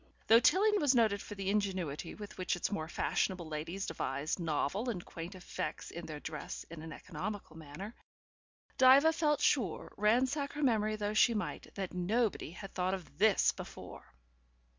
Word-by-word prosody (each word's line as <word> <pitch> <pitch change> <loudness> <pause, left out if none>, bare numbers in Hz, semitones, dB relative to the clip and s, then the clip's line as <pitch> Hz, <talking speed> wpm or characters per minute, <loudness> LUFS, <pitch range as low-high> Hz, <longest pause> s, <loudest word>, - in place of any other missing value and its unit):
Though 225 +1 +7
Tilling 410 - +4
was 285 -3 +4
noted 215 -4 +3
for 205 - -8
the 195 -1 -1
ingenuity 185 -7 -2
with 205 -1 -9
which 185 - 0
its 175 - -2
more 160 -6 -2
fashionable 175 +1 -1
ladies 165 +5 -4
devised 150 0 -2
novel 170 - -1
and 180 -7 -4
quaint 170 +3 -7
effects 175 -3 -5
in 170 0 -7
the 155 -2 -6
dress 150 0 -6
in 165 -2 -7
an 160 0 -8
economical 185 +2 -6
manner, 165 +7 -8 0.9
Diva 270 +5 +7
felt 300 -3 +1
sure, 225 - +1
ransack 260 +7 +2
her 295 +1 -3
memory 215 -4 +2
though 210 0 -2
she 230 +2 +5
might, 210 - -3
that 195 -2 -4
nobody 205 +2 0
had 190 +3 -9
thought 185 +1 0
of 185 -2 -12
THIS 210 -1 +5
before. - - -10
195 Hz, 165 wpm, -33 LUFS, 170-230 Hz, 0.9 s, Though